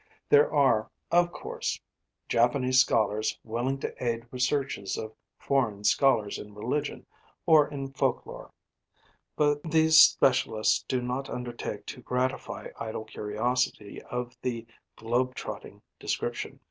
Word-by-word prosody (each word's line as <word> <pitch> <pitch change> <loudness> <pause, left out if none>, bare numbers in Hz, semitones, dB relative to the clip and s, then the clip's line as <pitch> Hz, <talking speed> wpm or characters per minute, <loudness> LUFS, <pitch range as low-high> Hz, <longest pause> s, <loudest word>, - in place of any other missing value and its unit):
There 145 0 +5
are, 130 -7 +3 0.2
of 175 0 +4
course, - - -4 0.5
Japanese 125 +2 +3
scholars 110 -3 +2
willing 120 +4 -2
to - - -5
aid 115 -1 -1
researches 130 -5 -1
of 110 0 -6 0.2
foreign 110 -7 0
scholars 110 -2 +2
in 105 0 -11
religion 125 +8 -3 0.4
or 155 -2 +6
in 135 -1 -6
folk - - 0
lore; - - -10 0.8
but 145 -1 +2
these 160 0 +5
specialists 130 -7 +4
do 125 -1 -1
not 125 +2 -3
undertake 120 -1 -5
to - - -8
gratify 125 +1 -2
idle 110 -1 -5
curiosity 110 0 -2
of 125 0 -4
the 115 -2 -3 0.3
'globe 125 +3 -1
trotting' - - -8 0.2
description. - - -3
125 Hz, 120 wpm, -28 LUFS, 110-135 Hz, 0.8 s, or